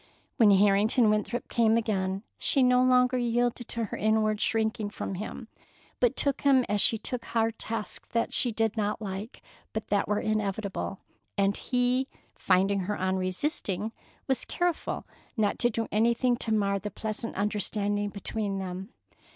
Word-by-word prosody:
When 225 -5 +6
Harrington 205 +3 +4
Winthrop 215 +3 -1
came 225 -1 +3
again, 195 -3 -1 0.2
she 275 - +2
no 250 0 +5
longer 255 0 +4
yielded 240 0 0
to 230 -1 -2
her - - -6
inward 215 0 +1
shrinking 220 -2 0
from 205 - -5
him, 215 +4 -6 0.5
but 250 +1 +3
took 280 -1 +1
him 265 -3 +4
as 205 0 +1
she 225 - +3
took 235 +2 -3
hard 225 -1 0
tasks 225 -2 -4
that 230 0 -1
she 245 - +2
did 225 0 0
not 210 -1 -1
like 205 +1 -6 0.3
but 220 - -4
that 205 -1 +1
were 210 0 +1
inevitable; 200 - -2 0.4
and 200 0 +2
he, 250 +1 +1 0.3
finding 195 +2 +2
her 205 +2 -3
unresisting, 190 - -1 0.3
was 265 -2 0
careful 350 -2 -2 0.3
not 210 -2 +1
to 240 - +3
do 225 0 -2
anything 235 +3 +2
to 225 - -1
mar 200 -2 +1
the 210 - -5
pleasant 220 +2 -4
understanding 205 0 -1
between 200 0 -3
them. 190 +1 -5
215 Hz, 155 wpm, -28 LUFS, 200-235 Hz, 0.5 s, When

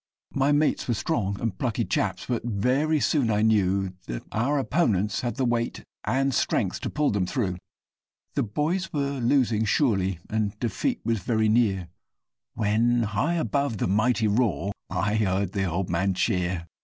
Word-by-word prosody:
My 135 +1 +2
mates 145 +1 +2
were 120 - +1
strong 100 -4 -1
and 115 -5 -2
plucky 120 +1 -1
chaps, - - -1
but 120 -2 -2
very 125 +8 +1
soon 140 -5 +2
I 105 0 +2
knew 95 -3 +2
That - - -5
our 135 +7 +1
opponents 110 - +1
had 120 -1 -2
the 135 - 0
weight 120 -1 -1 0.2
and 135 +1 +1
strength - - 0
to - - -2
pull 150 -1 +1
them 100 -3 0
through; 90 -5 -1 0.8
The - - +1
boys 155 - -1
were 140 -2 -1
losing 120 -3 +2
surely 100 - +1
and 105 -1 -2
defeat 235 - -1
was 115 -2 +1
very 110 +2 +1
near, 105 -6 +2 0.7
When, 115 +3 +2
high 110 - 0
above 140 -7 0
the - - 0
mighty 110 +3 +2
roar, 105 -2 +1 0.2
I 100 +3 0
heard 95 -3 0
the 95 -2 -1
old 90 +1 -1
man 90 +3 0
cheer! 90 -1 0
110 Hz, 165 wpm, -26 LUFS, 100-130 Hz, 0.8 s, My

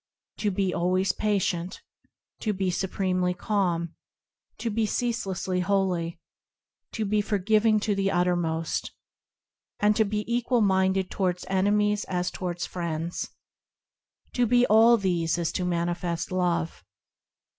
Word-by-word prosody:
To 210 - 0
be 190 -2 0
always 185 +2 +1
patient, 185 -4 -1 0.6
To 215 - -1
be 190 -1 -1
supremely 185 -1 0
calm, 175 -4 -1 0.6
To 230 - -3
be 220 +1 0
ceaselessly 195 -6 -1
holy, 180 -3 0 0.7
To 220 - -2
be 210 +1 +2
forgiving 215 +2 +2
to 210 0 +1
the 195 0 0
uttermost, 175 -3 0 0.9
And 210 +1 +3
to 220 - +4
be 210 0 -2
equal 240 0 +1
minded 190 -1 +2
towards 180 -2 -1
enemies 210 +2 +2
as 180 -1 -2
towards 175 -1 -4
friends,– 170 -1 -4 1.0
To 245 -1 +2
be 245 +2 +4
all 225 +2 +6
these 175 -5 0
is 170 -2 -1
to 180 - -2
manifest 170 0 -2
Love. 175 -2 -1
190 Hz, 125 wpm, -26 LUFS, 175-210 Hz, 1.0 s, all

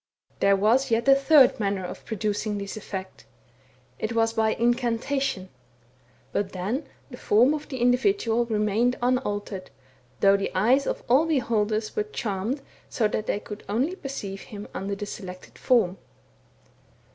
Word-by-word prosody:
There 200 0 +4
was 230 +7 +3
yet 230 +3 +1
a 275 - +9
third 275 -2 +5
manner 200 -3 -1
of 180 - -8
producing 210 0 -2
this 200 -1 -5
effect 190 -3 -7 0.4
— - - -33 0.3
it 220 +1 -2
was 225 0 +2
by 220 -1 +1
incantation; 240 -3 0 0.8
but 200 -1 -2
then 215 - -3 0.2
the 245 - -8
form 240 +7 +4
of 300 -1 -5
the 265 - -4
individual 245 - +2
re 225 -2 -1
mained 215 +4 +2
unaltered, 205 -6 -1 0.5
though 195 0 +5
the 195 - -3
eyes 250 +9 +3
of - - -2
all 275 +7 +4
beholders 220 -7 0
were 430 - +1
charmed 240 - -3 0.3
so 220 - +1
that 215 - -3
they - - 0
could 210 0 -9
only 260 - 0
perceive 210 - -6
him 205 -1 -9
under 200 +1 -3
the 205 - -5
selected 185 -3 -9
form. 195 -8 +2
220 Hz, 155 wpm, -26 LUFS, 200-255 Hz, 0.8 s, a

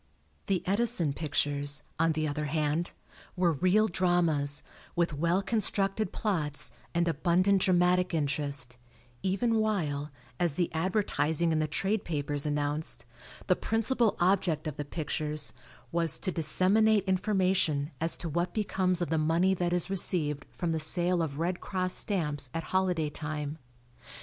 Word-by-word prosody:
The 195 -3 0
Edison 200 -6 +3
pictures, 145 -1 0 0.2
on 165 0 +3
the 155 0 -1
other 150 +1 -2
hand, 155 +3 -1 0.4
were 180 -2 +2
real 185 +8 +3
dramas, 170 -6 +1 0.3
with 170 -2 +1
well 170 +6 +1
constructed 195 -1 0
plots 155 -9 -2 0.2
and 170 0 +2
abundant 180 +4 +2
dramatic 180 0 +3
interest, 140 -5 -1 0.4
even 210 +5 +1
while, 160 -10 -1 0.3
as 170 -5 +2
the 175 0 -1
advertising 165 -3 0
in 160 - +1
the 155 - 0
trade 195 +7 -1
papers 145 -2 -1
announced, 145 +1 -2 0.4
the - - +3
principal 225 0 +1
object 180 -4 +1
of 155 -3 -4
the 145 - -5
pictures 150 -1 -1 0.4
was 165 -1 +2
"to 185 - -2
disseminate 200 +6 +3
information 185 -6 +1
as 165 +1 0
to 175 - -3
what 175 +3 -2
becomes 185 -4 0
of 165 - -5
the 160 - +2
money 165 +5 +2
that 175 -2 -1
is 180 +1 0
received 155 -6 0
from 175 -2 -3
the 160 - -1
sale 175 +3 +1
of 145 -4 -3
Red 175 +3 -1
Cross 185 -1 -2
stamps 150 - -1
at 165 - -2
holiday 180 -5 +1
time." 150 0 -5
170 Hz, 145 wpm, -29 LUFS, 150-185 Hz, 0.4 s, Edison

